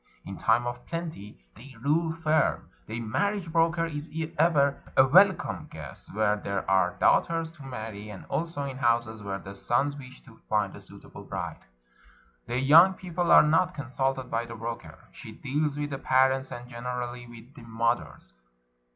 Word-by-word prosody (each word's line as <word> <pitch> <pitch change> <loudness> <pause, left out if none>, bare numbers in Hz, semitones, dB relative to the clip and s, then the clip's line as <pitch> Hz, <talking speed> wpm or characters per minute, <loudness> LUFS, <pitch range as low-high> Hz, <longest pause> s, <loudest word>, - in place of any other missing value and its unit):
In - - -6
time 120 - +2
of 120 0 -5
plenty, 165 -12 -6 0.2
they 130 +4 -14
"rule 160 +6 +1
firm." 160 -2 0 0.2
The 110 +1 -4
marriage 175 - -1
broker 165 0 +2
is 150 -1 -6 0.3
ever 145 -3 +3 0.2
a 130 - +8
welcome 190 +8 +4
guest - - -10
where 105 -1 +2
there 100 -1 -3
are 95 -2 +2
daughters 165 -1 +2
to 160 -4 -14
marry, 110 -5 -7
and 100 -3 -9
also 165 -3 -3
in 135 -2 -5
houses 115 -3 +1
where 100 -1 -4
the 100 0 -10
sons 130 +8 0
wish 130 -2 -11
to 115 -4 -17
find 105 -2 0
a - - -10
suitable - - -12
bride. - - -5 0.9
The 120 - -2
young 165 +8 +7
people 175 -1 -2
are - - +9
not 160 +3 +2
consulted 135 -1 -2
by 115 +1 -1
the 115 - -8
broker. 115 +1 -6
She - - -11
deals 145 +1 -2
with 145 0 -3
the 135 - -4
parents, 130 0 +2
and 120 -1 -7
gener 125 +1 -5
ally 120 0 -9
with 120 +3 -14
the 145 - -13
mothers. 110 - -2
130 Hz, 170 wpm, -27 LUFS, 115-155 Hz, 0.9 s, are